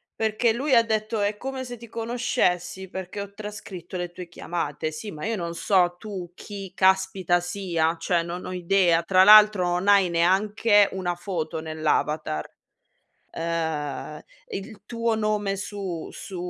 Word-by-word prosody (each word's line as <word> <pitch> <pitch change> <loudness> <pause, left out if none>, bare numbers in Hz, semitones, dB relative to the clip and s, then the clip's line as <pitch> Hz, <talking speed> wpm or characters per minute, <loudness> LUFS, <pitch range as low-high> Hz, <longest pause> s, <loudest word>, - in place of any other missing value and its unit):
perché 220 +1 +1
lui 270 +3 -1
ha 230 - +8
detto: 220 0 -1
"È 205 +1 0
come 265 +1 -5
se 245 -1 -7
ti 235 +1 -12
conoscessi, 225 -6 -1
perché 190 +2 -6
ho 200 0 -7
trascritto 200 -4 -8
le 175 -1 -3
tue 175 0 -9
chiamate". 160 -2 -4
Sì, 205 +7 -7
ma 150 -1 -9
io 225 - 0
non 170 -3 -4
so 175 -1 +2
tu 190 -5 -7
chi 195 -1 -9
caspita 190 -2 +2
sia, 175 -3 -1
cioè 170 -3 +1
non 175 +2 -6
ho - - -5
idea. 175 -2 +3
Tra 185 +1 +5
l'altro 210 -3 +8
non 180 +3 -1
hai 200 -3 +5
neanche 200 +4 +3
una 180 -2 -2
foto 170 -3 -4
nell'avatar. 155 - -1 0.8
Ehm, 160 -3 -3 0.3
il 200 +2 -7
tuo 230 0 -1
nome 210 -2 0
su 195 -4 -5
su 190 - -8
190 Hz, 155 wpm, -25 LUFS, 170-210 Hz, 0.8 s, ha